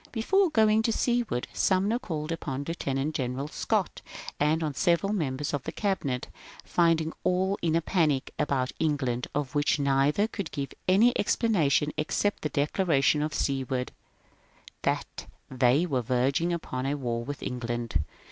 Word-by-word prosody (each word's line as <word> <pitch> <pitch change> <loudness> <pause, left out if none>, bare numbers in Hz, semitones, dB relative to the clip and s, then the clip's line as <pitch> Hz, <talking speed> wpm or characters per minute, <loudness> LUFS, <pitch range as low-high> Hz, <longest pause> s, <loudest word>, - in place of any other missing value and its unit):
Before 375 - +2
going 220 -5 +4
to 225 - +1
Seward, 235 - 0
Sumner 200 +5 +2
called 160 -9 -4
upon 140 -4 -3
Lieutenant 145 -3 -2
General 130 +1 -2
Scott - - -1 0.4
and 155 +3 +2
on 150 -2 -1
several 175 +7 +2
members 150 -7 -2
of 145 - -1
the - - -5
Cabinet, 160 -11 -2 0.4
finding 165 -2 +2
all 190 +2 +1
in 165 -1 +1
a 165 - +1
panic 155 -8 +1
about 130 -3 0
England 135 -6 0
of 145 -2 -2
which 145 +1 +2
neither 140 +7 +2
could 200 -6 -5
give 140 -2 -4 0.2
any 215 +7 +5
explanation 160 - +2
except 205 +6 0
the 150 - -1
declaration 150 0 +2
of 150 +1 -1
Seward, 130 -2 -1 0.9
that - - -2 0.2
they 130 +5 +3
were 135 -7 0
verging 130 +8 +1
upon 135 -6 -3
a 140 - 0
war 120 -3 -2
with 145 +2 -6
England. 120 -7 -2
150 Hz, 145 wpm, -28 LUFS, 135-185 Hz, 0.9 s, any